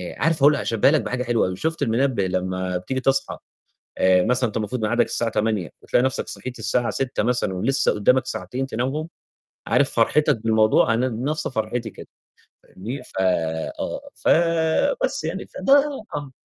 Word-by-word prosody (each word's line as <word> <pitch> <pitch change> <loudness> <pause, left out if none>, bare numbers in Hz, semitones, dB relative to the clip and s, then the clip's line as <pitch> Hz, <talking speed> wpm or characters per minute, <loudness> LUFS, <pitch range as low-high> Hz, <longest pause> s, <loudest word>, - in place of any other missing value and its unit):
آآ - - -16
عارف 165 0 +3
هاقول 150 +1 +7
هاشبّاها 115 -1 +2
لك 155 -3 +2
بحاجة 125 +4 -3
حلوة 120 -4 +1
أوي، 90 - -4
شُفت 160 - -3
المنبّه 125 -3 +1
لمّا 95 0 -2
بتيجي 130 +9 -3
تصحى 135 +1 0 0.6
آآ، 95 -1 +4
مثلًا 125 +3 +1
وأنت 105 - -4
المفروض 110 +3 -3
ميعادك 120 +2 +2
الساعة 115 -1 -1
08:00 105 -6 -1
فتلاقي 125 - +2
نَفْسك 130 - -1
صحيت 130 -2 -6
الساعة 115 +2 0
06:00 135 -4 -2
مثلًا 120 -4 0
ولسه 115 +9 +1
قدّامك 125 +6 +2
ساعتين 125 +9 -4
تنامهم، 135 +6 -3 0.6
عارف - - +3
فرحتك 150 -4 +3
بالموضوع 110 0 +3
أنا 125 +3 +1
بنَفْس 130 +7 -2
فرحيتي 110 -1 -3
كده - - -12 0.6
فاهمني، 115 +9 -7
ف - - -9
آه، 80 -4 -2
ف - - -6 0.8
بس - - -1
يعني، - - -4
فده 275 - +1 0.4
آه، 145 -2 -5
120 Hz, 165 wpm, -22 LUFS, 105-130 Hz, 0.8 s, هاقول